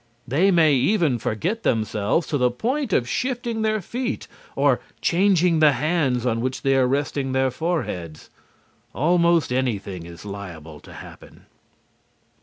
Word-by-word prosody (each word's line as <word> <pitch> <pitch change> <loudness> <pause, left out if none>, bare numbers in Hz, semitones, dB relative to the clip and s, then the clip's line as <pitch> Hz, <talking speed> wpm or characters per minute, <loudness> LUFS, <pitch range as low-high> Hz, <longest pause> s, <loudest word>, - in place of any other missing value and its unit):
They 160 +11 +3
may 165 -5 +4
even 140 - +2
forget 175 - -2
themselves 110 - 0
to 145 - 0
the 125 0 +3
point 250 - -2
of 120 -8 +1
shifting 240 - -2
their 215 -1 0
feet 250 +7 -4 0.3
or - - +3 0.2
changing 180 -2 +2
the 150 -2 +5
hands 135 -3 0
on 115 -2 0
which 130 +1 -3
they 135 -1 +3
are 130 -1 +3
resting 135 0 -1
their 130 0 +1
foreheads. 125 - -4 0.6
Almost 170 -1 +2
anything 100 -9 -2
is 85 +3 -12
liable 85 -7 -8
to - - -14
happen. - - -13
140 Hz, 140 wpm, -23 LUFS, 120-175 Hz, 0.6 s, the